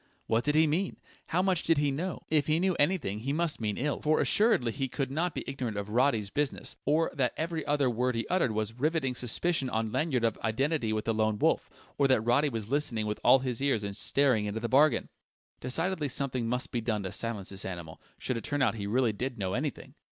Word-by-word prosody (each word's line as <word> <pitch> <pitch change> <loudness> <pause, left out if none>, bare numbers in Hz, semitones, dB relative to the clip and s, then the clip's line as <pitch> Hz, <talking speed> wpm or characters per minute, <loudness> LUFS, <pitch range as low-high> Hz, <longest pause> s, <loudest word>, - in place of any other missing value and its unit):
What 115 +1 +1
did 150 +3 +1
he 160 +1 +6
mean? 170 +6 -1 0.3
How 180 +3 +1
much 185 -3 +2
did 165 -2 +2
he 145 -1 +2
know? 170 +6 -4
If 150 -2 +3
he 155 +1 +2
knew 185 +1 +2
anything, 145 - +1
he 130 +5 -3
must 165 -4 -1
mean 105 -2 -1
ill, 145 +2 -1
for 155 +1 +2
assuredly 205 - +2
he 135 +2 -2
could 135 +1 -3
not 165 +3 -1
be - - -3
ignorant 125 -6 -4
of 100 0 -4
Roddy's 115 -4 +2
business, 145 -1 -2
or 155 +3 +2
that 130 -4 0
every 160 0 -2
other 145 -2 +2
word 125 +1 0
he 115 - -1
uttered 180 -9 +1
was 110 0 -2
rivetting 140 +1 0
suspicion 130 +4 0
on 110 -2 -1
Lanyard 130 -1 0
of 115 -2 0
identity 120 +2 0
with 110 0 -2
the 115 - +1
Lone 110 -1 +1
Wolf, - - +1 0.3
or 140 - +5
that 130 -4 +3
Roddy 120 +6 +3
was 115 -5 -4
listening 125 -5 0
with 105 0 -3
all - - +7
his 130 -2 -3
ears 135 -7 +1
and 100 -1 -4
staring 125 0 +2
into 105 +2 -3
the 120 - -2
bargain! 145 +5 +4 0.5
Decidedly 165 +4 0
something 130 -3 -2
must 125 +2 -2
be 120 - -1
done 110 -3 -1
to 95 - -4
silence 110 -5 -4
this 95 0 -5
animal, 85 -4 -7 0.2
should 125 - -3
it 115 - -6
turn 145 -1 0
out - - +3
he 100 -3 -5
really 120 +1 +2
did 125 +4 -4
know 95 -3 -2
anything! - - -4
130 Hz, 230 wpm, -29 LUFS, 110-150 Hz, 0.5 s, all